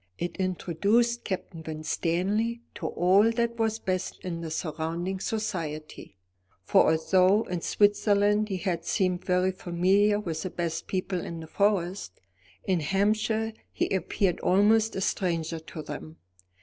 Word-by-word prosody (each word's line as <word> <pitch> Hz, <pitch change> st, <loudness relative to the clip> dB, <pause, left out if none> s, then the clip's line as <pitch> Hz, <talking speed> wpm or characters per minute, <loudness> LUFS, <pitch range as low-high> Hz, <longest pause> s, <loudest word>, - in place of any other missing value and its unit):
It 175 Hz, -, -3 dB
introduced 200 Hz, +6 st, +1 dB
Captain 180 Hz, -4 st, -4 dB
Winstanley 180 Hz, +9 st, -1 dB
to -, -, -4 dB
all 190 Hz, +5 st, +4 dB
that 235 Hz, 0 st, -1 dB
was 225 Hz, -1 st, +1 dB
best 185 Hz, -4 st, -3 dB
in 170 Hz, -2 st, -4 dB
the 165 Hz, -, -5 dB
surrounding 165 Hz, +4 st, -3 dB
society; 165 Hz, -, -4 dB, 0.5 s
for -, -, +4 dB
although 185 Hz, +6 st, +3 dB
in 180 Hz, -5 st, -4 dB
Switzerland 205 Hz, +1 st, +3 dB
he 190 Hz, -, -1 dB
had 170 Hz, -2 st, -2 dB
seemed 180 Hz, 0 st, 0 dB
very 180 Hz, 0 st, +2 dB
familiar 190 Hz, +3 st, +2 dB
with 165 Hz, -6 st, -4 dB
the 185 Hz, -, -3 dB
best 165 Hz, -2 st, -3 dB
people 185 Hz, -1 st, -2 dB
in 170 Hz, -, -6 dB
the 160 Hz, -, -7 dB
Forest, 190 Hz, -, -1 dB, 0.4 s
in 185 Hz, -3 st, +1 dB
Hampshire 215 Hz, +6 st, +1 dB, 0.2 s
he -, -, -1 dB
appeared 190 Hz, 0 st, 0 dB
almost 215 Hz, +4 st, +3 dB
a 190 Hz, -, -2 dB
stranger 165 Hz, -4 st, -1 dB
to 160 Hz, 0 st, -9 dB
them. 155 Hz, +2 st, -8 dB
185 Hz, 135 wpm, -27 LUFS, 170-205 Hz, 0.5 s, all